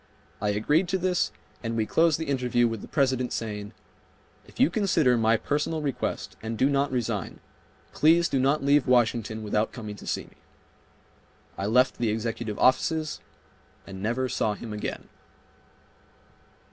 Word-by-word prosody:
I 105 - +1
agreed 145 - +2
to 190 - 0
this, 180 -1 0 0.3
and 115 -1 -3
we 110 - +1
closed 160 +5 +3
the 160 - -4
interview 125 -4 +1
with 115 -2 -4
the - - -9
President 130 -3 +1
saying, 105 -2 -4 0.8
"If - - -17
you 165 - +4
consider 170 - +3
my 110 -1 +3
personal 150 +5 -1
request 140 -3 -3
and 110 0 -4
do 135 +5 +3
not 140 0 +1
resign, 125 -4 -2 0.5
please 170 +2 +4
do 135 - 0
not 140 +3 +2
leave 140 -1 +3
Washington 115 -3 +1
without 105 +1 0
coming 105 -4 -7
to - - -11
see - - -1
me." - - -20 1.2
I 100 - -3
left 125 +4 +3
the 120 -2 +1
executive 110 0 -3
offices 155 +4 +2 0.7
and 95 -1 -9
never 120 +5 0
saw 105 -4 -1
him 110 +1 -7
again. 105 - -5
125 Hz, 155 wpm, -26 LUFS, 110-145 Hz, 1.2 s, you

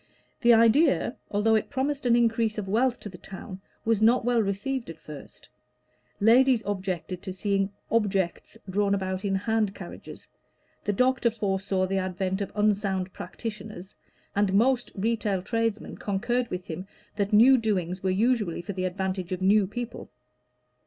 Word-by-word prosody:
The 240 - +6
idea, 235 +4 +4
although 210 +2 +2
it 220 - +1
promised 280 0 -1
an 235 - +5
increase 230 -2 +2
of 205 -2 -3
wealth 240 +5 +1
to - - -7
the 180 -3 -10
town, 190 0 -9 0.2
was 225 -2 +2
not 235 +2 +4
well 240 -1 +3
received 220 +5 -2
at 165 - -8
first; 150 -3 -12 0.7
ladies 240 +2 +5
objected 185 -3 -3
to 190 - -6
seeing 195 +1 0 0.2
"objects" 195 -6 0
drawn 200 +1 +1
about 190 0 -3
in 195 -1 0
hand 215 0 0
carriages, - - -10 0.6
the 205 - +1
doctor 250 +3 +2
foresaw 195 -3 -1
the 190 +1 -1
advent 190 +1 -2
of 200 - -3
unsound 200 -3 0
practitioners, 210 -1 -7 0.4
and 200 -1 +2
most 245 +3 +3
retail 210 -2 -1
tradesmen 225 0 -2
concurred 240 +5 -1
with 180 0 -5
him 175 +4 -6 0.3
that 200 -1 0
new 235 +6 +7
doings 190 -6 -1
were 190 - 0
usually 210 -3 +1
for 200 - -5
the 185 0 -2
advantage 185 0 -3
of 185 0 -3
new 200 +1 +4
people. 240 +3 -6
205 Hz, 155 wpm, -27 LUFS, 190-230 Hz, 0.7 s, new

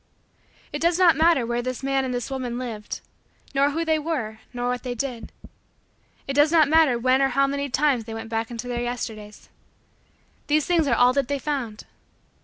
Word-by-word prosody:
It - - -3
does 340 +1 +2
not 360 -3 +6
matter 320 -4 +3
where 240 +1 -1
this 255 +1 -5
man 270 0 +1
and 260 - -2
this 245 +1 -3
woman 250 -3 -3
lived, 230 -4 -6 0.5
nor 280 +1 +3
who 325 +3 -2
they 315 -1 +2
were, 260 -9 -3
nor 245 0 -3
what 250 0 -1
they 250 -2 -4
did. 245 -3 -5 1.0
It 275 - -2
does 290 +2 +4
not 320 -3 +5
matter 310 -5 +4
when 255 +3 +2
or 270 - +4
how 275 +1 +2
many 280 +1 -2
times 265 -4 +1
they 225 - -7
went 225 0 -6
back 225 0 -2
into 240 0 -6
Their 240 -1 -2
Yesterdays. 220 -4 -6 1.0
These 300 0 +2
things 335 -4 +2
are 240 - +3
all 245 +2 +5
that 275 -2 0
they 285 - -1
found. 260 -7 -4
260 Hz, 200 wpm, -24 LUFS, 240-290 Hz, 1.0 s, not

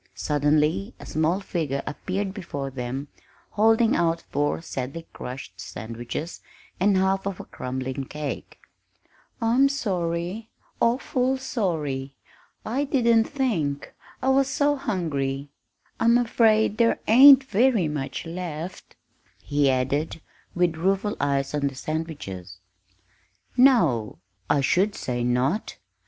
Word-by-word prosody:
Suddenly 150 - +1
a - - -10
small 160 +4 0
figure 155 -8 -2
appeared 190 +5 -3
before 145 -9 -5
them 130 +2 -4 0.4
holding 225 +2 +4
out 165 -1 +1
four 145 0 0
sadly 150 +1 -5
crushed 125 -8 -8
sandwiches 115 - -6 0.4
and 195 +1 +3
half 190 +1 +1
of 195 -2 -4
a - - -7
crumbling 130 +1 -4
cake. 150 +1 -6 0.8
"I'm 245 +4 +3
sorry 185 -3 -2 0.3
awful 255 +2 +1
sorry! 155 - -2 0.5
I 255 +6 0
didn't 235 -5 +3
think 195 - -2 0.3
I 265 - +2
was 270 0 +4
so 285 +2 +2
hungry. 145 - -2 0.5
I'm 235 +1 +5
afraid 220 -2 +3
there 230 -1 +3
ain't 270 +4 +9
very 235 - +2
much 150 0 -4
left," 170 0 -6 0.5
he 145 -1 +2
added, 135 +5 0 0.4
with 175 -2 +1
rueful 195 +5 0
eyes 140 -1 0
on 145 -1 +1
the 135 - -5
sandwiches. 135 - -5 1.0
"No, 170 - +4 0.3
I 145 - +3
should 190 +9 +2
say 120 -1 -3
not!" 125 - 0
170 Hz, 115 wpm, -25 LUFS, 140-225 Hz, 1.0 s, ain't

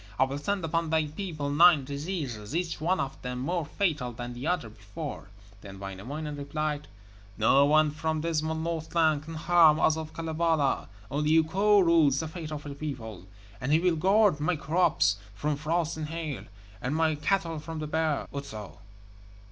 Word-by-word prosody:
I 130 - +5
will 135 +2 -2
send 195 +3 -1
upon 165 0 -1
thy 160 -1 +2
people 155 -2 -4
nine 155 -2 +6
diseases, 140 - -4
each 170 -3 -2
one 180 +4 +1
of 135 0 -4
them 125 0 -4
more 160 +5 -2
fatal 150 -9 -1
than 120 +1 -6
the 125 +5 -5
one 180 0 +2
before.' 110 +4 -8 0.3
Then 95 -2 -10
Wainamoinen 130 +11 -6
replied: 150 +1 -3 0.5
'No 135 +6 +5
one 155 0 +4
from 160 0 -2
dismal 160 -1 -1
Northland 160 -1 0
can 165 0 -7
harm 160 -1 +5
us 160 0 +3
of 160 -1 -5
Kalevala, 160 -3 0 0.2
Only 150 +3 +2
Ukko 195 +6 +4
rules 160 -6 +4
the 160 - -3
fate 160 -1 -7
of 150 -1 -6
peoples, 110 -11 -6 0.3
and 130 +3 -1
he 155 - +6
will 175 0 +2
guard 195 0 +3
my 155 +4 +1
crops 140 - +2 0.2
from 150 +7 -1
frost 160 +2 -1
and 155 -1 -4
hail, 160 -4 -4 0.4
and 130 +4 -2
my 160 0 +2
cattle 165 +1 0
from 160 +1 -7
the 155 - -3
bear, 155 -1 0
Otso. 110 -8 -7
155 Hz, 170 wpm, -28 LUFS, 140-165 Hz, 0.5 s, nine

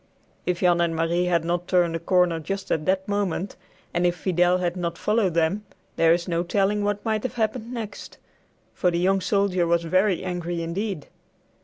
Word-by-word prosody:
If 180 -1 0
Jan 175 -1 +4
and 170 -1 +1
Marie 165 +2 +1
had 170 -2 +1
not 175 +1 -1
turned 175 -3 +2
a - - -2
corner 175 -1 +2
just 195 +5 -5
at 155 +1 0
that 190 0 +1
moment, 200 -2 -1 0.4
and 175 - +1
if 175 - 0
Fidel 180 0 +2
had 175 -1 -1
not 170 -2 -3
followed 210 -5 +1
them, 170 +5 +1 0.3
there 165 0 +4
is 170 +1 +1
no 170 -1 0
telling 200 +3 +1
what 205 +1 -2
might 215 -1 0
have 255 - -4
happened 225 +1 -2
next, 220 -4 -7 0.6
for 180 - +1
the 170 - -1
young 190 +2 +2
soldier 190 -3 +1
was 170 0 +2
very 185 +2 +2
angry 175 -2 -3
indeed. 185 0 -3
180 Hz, 190 wpm, -24 LUFS, 170-200 Hz, 0.6 s, Jan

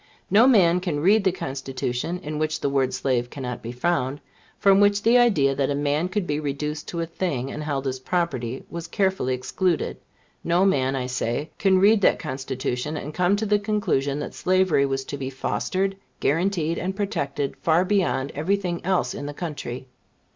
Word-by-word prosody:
No 220 +6 +7
man 180 -8 +5
can 175 -5 -2
read 200 +7 +4
the 190 - +3
Constitution 135 0 -3
in 150 0 -4
which 155 0 -1
the 140 - 0
word 135 -2 +1
slave 120 -3 -1
cannot 125 -3 -5
be 115 - -6
found; 135 0 -1 0.4
from 195 -1 +5
which 205 0 +3
the 235 +2 +5
idea 155 - +4
that 135 0 0
a 140 - 0
man 145 +4 0
could 205 -1 -1
be 150 -2 -1
reduced 150 +1 -3
to 170 - -3
a - - -1
thing, 160 -6 -3
and 150 - -5
held 140 -2 -2
as 130 -1 -2
property, 130 -6 -2
was 170 0 -6
carefully 190 - 0
excluded 170 +7 -1 0.5
no 175 +3 +3
man, 135 -8 +2
I 130 -2 -2
say, 125 +3 -2
can 195 -2 +4
read 205 +3 +5
that - - +4
Constitution, 130 +2 -3
and 150 +1 -6
come 180 +3 +2
to 215 +2 -2
the 210 0 +2
conclusion 200 -10 0
that - - -5
slavery 185 -6 +2
was 135 0 -2
to 145 - -5
be 130 -1 -3
fostered, 190 +8 -1 0.2
guaranteed 165 +1 0
and 190 +2 -3
protected 145 -9 -2
far 170 +3 +2
beyond 180 -9 +1
every 160 +8 +1
thing 180 -4 -3
else 185 0 +1
in 145 - -5
the 145 - -6
country. 145 -7 -5
155 Hz, 190 wpm, -24 LUFS, 135-190 Hz, 0.5 s, No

